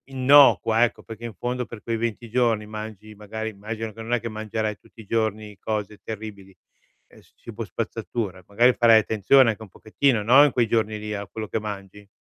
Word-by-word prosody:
Innocua, 135 -4 +5
ecco, 120 - -1
perché 115 +1 -9
in 115 -3 -7
fondo 125 +2 -3
per 115 -2 -11
quei 115 - -2
20 115 +1 -3
giorni 115 -2 +1
mangi 110 0 -8
magari 110 +2 -6
immagino 110 +1 -6
che 115 - -10
non 115 +2 -4
è 120 - +2
che 115 - -5
mangerai 110 -1 -3
tutti 115 - -16
i - - -15
giorni 110 -1 -2
cose 105 -1 -4
terribili, 100 -3 -8 0.5
es - - -21
cibo - - -7
spazzatura, 95 -6 -5
magari 120 +5 +4
farai 115 -2 +6
attenzione 110 +4 +4
anche 110 - -9
un 110 - -10
pochettino, 110 +3 0
no, 130 +7 +7
in 145 - +3
quei 120 -2 +1
giorni 110 -1 0
lì 105 0 -5
a 100 -1 -5
quello 110 +2 -6
che 110 - -2
mangi. 100 -1 -8
110 Hz, 195 wpm, -24 LUFS, 105-115 Hz, 0.5 s, no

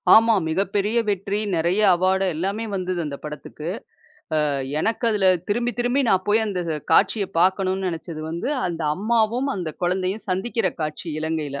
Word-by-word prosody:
ஆமா, 225 +1 +6
மிகப்பெரிய 200 +6 0
வெற்றி. 200 0 -1 0.2
நெறைய 175 +5 +2
அவார்ட் 190 +2 +1
எல்லாமே 195 +7 -2
வந்தது 185 -2 -2
அந்தப் 140 -2 -7
படத்துக்கு. 150 +1 -7 0.8
அ - - +1 0.3
எனக்கு 225 +6 0
அதுல 205 -3 +2 0.2
திரும்பி 240 +4 0
திரும்பி 245 +3 +2
நான் 185 -2 +2
போய் 215 +2 +4
அந்தக் 180 -5 -3 0.2
காட்சியைப் 200 +3 +3
பாக்கணும்ன்னு 190 +1 +1
நெனைச்சது 165 -1 -6
வந்து, 170 +9 -3 0.2
அந்த 170 -2 -4
அம்மாவும் 230 +5 +1
அந்தக் 170 -5 -5
குழந்தையும் 185 +4 -1
சந்திக்கிற 195 +3 0
காட்சி, 155 +3 -4
இலங்கையில. 155 -3 -2
190 Hz, 145 wpm, -23 LUFS, 170-215 Hz, 0.8 s, ஆமா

